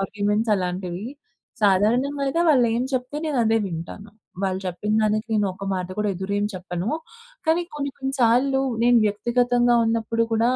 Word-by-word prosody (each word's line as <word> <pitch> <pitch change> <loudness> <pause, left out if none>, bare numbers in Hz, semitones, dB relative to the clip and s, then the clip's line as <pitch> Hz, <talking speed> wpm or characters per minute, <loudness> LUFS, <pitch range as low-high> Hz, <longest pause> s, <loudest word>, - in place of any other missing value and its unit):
Arguments 210 +2 0
అలాంటివి. 180 +1 -3 0.6
సాధారణంగా 235 +9 +2
అయితే 300 +5 0
వాళ్ళేం 240 -4 +3
చెప్తే 255 +2 -2
నేనదే 235 -7 +2
వింటాను. 185 +4 -7 0.3
వాళ్ళు 190 -1 -1
చెప్పిందానికి 215 +4 0
నేనొక 200 -2 -1
మాట 185 -1 -2
కూడా 210 0 +1
ఎదురెం 200 +3 -2
చెప్పను. 180 +1 -4 0.6
కానీ 325 +2 +3
కొన్ని, 280 -1 -3
కొన్ని 270 0 -3
సార్లు 250 +3 +3 0.2
నేను 240 0 +5
వ్యక్తిగతంగా 240 +3 +2
ఉన్నప్పుడు 230 0 0
కూడా 225 +1 +3
220 Hz, 130 wpm, -23 LUFS, 195-245 Hz, 0.6 s, నేను